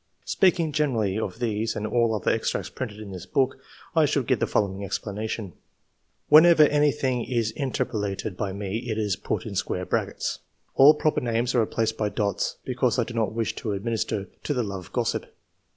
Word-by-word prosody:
Speaking 175 -4 +2
generally 115 -9 0
of 105 -3 -4
these 115 -2 -1
and 105 - -3
all 115 0 +2
other 105 - +1
extracts - - -1
printed 110 -5 -6
in 105 -2 -8
this 90 -2 -8
book, 135 -3 +1 0.4
I - - +5
should - - 0
give - - +1
the - - +1
following 100 -1 0
explanation: 105 -1 -4 0.4
— - - -47
Whenever 160 +1 +8
anything 145 -4 +2
is 115 -3 -1
interpolated 105 -7 -2
by 100 0 -2
me 100 +2 -3
it 110 - -1
is 105 -3 0
put - - -3
in 110 - -5
square 90 -1 -2
brackets - - -2
[ - - -45
]. - - -43
All 145 +3 +8
proper 155 0 +1
names 120 0 0
are 125 - +3
replaced 110 0 0
by 105 -1 +1
dots, 100 -1 -1
because 125 -1 0
I 120 - +3
do 120 - -8
not 110 -2 0
wish 115 -1 -2
to 105 - -3
administer 105 -1 -2 0.2
to 145 - -1
the 125 - +1
love 95 -3 -5
of - - -21
gossip. - - -1
110 Hz, 200 wpm, -25 LUFS, 105-125 Hz, 0.4 s, Whenever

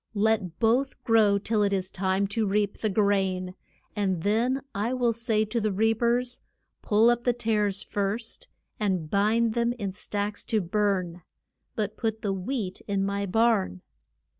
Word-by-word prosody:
Let 205 -5 +1
both 245 +5 +1
grow 215 -3 +4
till 210 +1 0
it 200 -1 +2
is 190 -1 -1
time 190 +1 0
to 215 +1 0
reap 205 0 0
the 215 - 0
grain; 190 -3 +1 0.4
and 190 -5 -1
then 235 +6 +1
I 225 +6 -1
will 240 -2 +2
say 220 -1 0
to 225 +2 -2
the 215 0 0
reap 225 +3 +1
ers, 245 +1 +1 0.4
Pull 220 +2 +4
up 240 0 -1
the 245 - +2
tares 210 -4 0
first 205 +3 -3 0.3
and 185 -7 -1
bind 220 +3 +2
them 235 0 +1
in 205 -5 -4
stacks 205 +2 -3
to 220 - +1
burn. 185 -2 -1 0.5
But 210 -2 -2
put 220 -2 -2
the 200 -2 0
wheat 195 0 -4
in 195 -1 0
my 200 0 -2
barn. 205 - +1
210 Hz, 165 wpm, -27 LUFS, 195-225 Hz, 0.5 s, grow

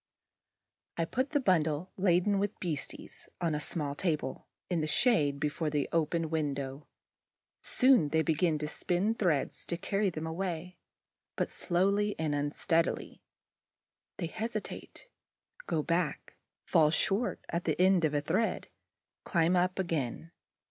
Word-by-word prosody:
I 165 - +1
put 260 - -1
the 290 - +1
bunch 185 - +3 0.3
laden 190 +1 +3
with 205 +1 -2
beasties 160 -6 -5
on 170 -3 0
a 150 - -1
small 150 -2 -1
table, 150 -4 -2 0.2
in 175 -3 0
the 155 - -1
shade, 155 - +3
before 150 +2 -1
the 145 -2 0
open 165 0 0
window. 140 -3 -2 0.7
Soon 250 - +4
they 160 +1 +2
begin 160 0 +2
to 150 0 -3
spin 180 +7 0
threads 175 -11 0
to 170 - -2
carry 200 +2 0
them 160 -2 -5
away, 175 +1 -4 0.6
but - - -1
slowly 200 +4 +1
and 155 -2 -1
unsteadily. 145 +3 0 1.0
They 175 - -2
hesitate, 215 +4 -5 0.6
go 155 - 0
back, 170 -2 -1 0.3
fall 155 -2 +4
short 200 +8 0
at 170 +1 -2
the - - 0
end 185 -1 +5
of 150 -1 +2
a 145 - +2
thread, 190 +10 0 0.5
climb 170 +1 +2
up 180 +1 +2
again. 165 -3 -2
165 Hz, 135 wpm, -31 LUFS, 150-190 Hz, 1.0 s, end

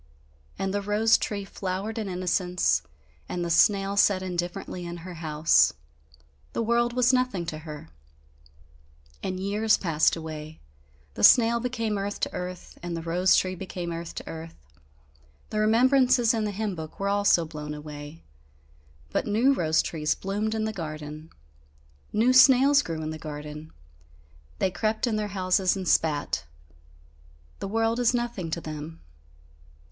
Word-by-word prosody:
And 195 0 -2
the 205 - 0
rose 210 +3 +3
tree 200 -2 -2
flowered 195 +4 -4
in 210 -3 -3
innocence, 180 - +1 0.5
and 175 -1 -2
the 170 - -2
snail 195 +3 +3
sat 200 -2 +3
indifferently 180 0 -4
in 175 0 -6
her 185 - -7
house. 155 -1 +3 0.8
The - - -1
world 235 +1 +1
was 250 +1 +3
nothing 250 -9 0
to 155 -2 -5
her. 150 - -9 1.3
And 185 -1 -3
years 205 +3 +2
passed 160 -4 +2
away. 155 -1 -8 0.5
The 100 - -5
snail 235 - +7
became 230 -4 -2
earth 200 +1 -4
to - - -1
earth 180 0 -7
and 175 -1 -4
the 165 - -5
rose 180 +3 +3
tree 185 0 +1
became 180 -2 -5
earth 165 0 -6
to - - -7
earth; 165 0 -8 1.0
the 215 - -1
remembrances 245 +2 +4
in 220 -2 0
the 210 - -2
hymn 210 0 -3
book 160 -3 -8
were 200 - -1
also 200 -4 +3
blown 150 -1 -7
away 150 +1 -9 0.9
but - - -1
new 230 +7 +3
rose 160 -9 +2
trees 155 -2 -1
bloomed 210 +3 -2
in 220 - -1
the 220 0 -2
garden, 155 -3 -7 0.8
new 235 +4 +3
snails 270 +2 +7
grew 160 - -5
in 155 - -3
the 155 - -7
garden; 150 0 -8 0.9
they 190 - 0
crept 215 +5 -1
in 235 -3 0
their 210 -1 -1
houses 185 0 +2
and 185 -2 -4
spat. 145 - +1 1.1
The - - -4
world 225 +3 0
is 245 0 +3
nothing 235 -8 -3
to 165 - -2
them. 155 +1 -7
185 Hz, 150 wpm, -26 LUFS, 160-220 Hz, 1.3 s, snail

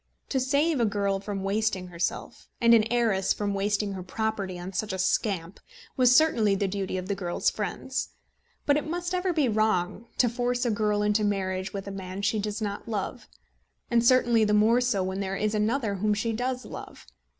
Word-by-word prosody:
To 265 - +1
save 280 +4 +1
a 235 - +3
girl 200 -2 0
from 200 -1 -5
wasting 195 -2 -1
herself, 170 0 -4
and 235 0 +5
an 225 0 +4
heiress 220 -6 +2
from 205 -1 -2
wasting 200 +1 0
her 190 - -5
property 200 -1 -3
on 180 +2 -7
such 210 +3 -2
a 190 - -3
scamp, 185 -2 -1 0.4
was 250 -1 +5
certainly 230 -10 +4
the 195 0 0
duty 195 -1 -3
of 185 0 -5
the 200 - 0
girl's 180 -3 0
friends. - - -3 0.6
But 285 0 +4
it 300 - -3
must 350 +2 -3
ever 365 0 +1
be 310 -6 +2
wrong 215 -1 0
to 250 - +4
force 245 +1 -1
a 240 - +2
girl 210 -1 +1
into 210 +1 +2
a - - +1
marriage 190 -1 -1
with 200 -2 -5
a - - -4
man 190 0 -6
she 215 +1 +1
does 210 +1 -3
not 205 +2 -4
love, 215 +3 -4 0.6
and 235 -1 +4
certainly 240 -2 +4
the 210 0 +3
more 225 +4 +4
so 225 -6 +1
when 190 +1 -3
there 195 -1 -2
is 215 0 0
another 215 +1 0
whom 210 +2 +1
she 225 +2 -1
does 250 +2 -2
love. - - -9
210 Hz, 205 wpm, -27 LUFS, 195-235 Hz, 0.6 s, and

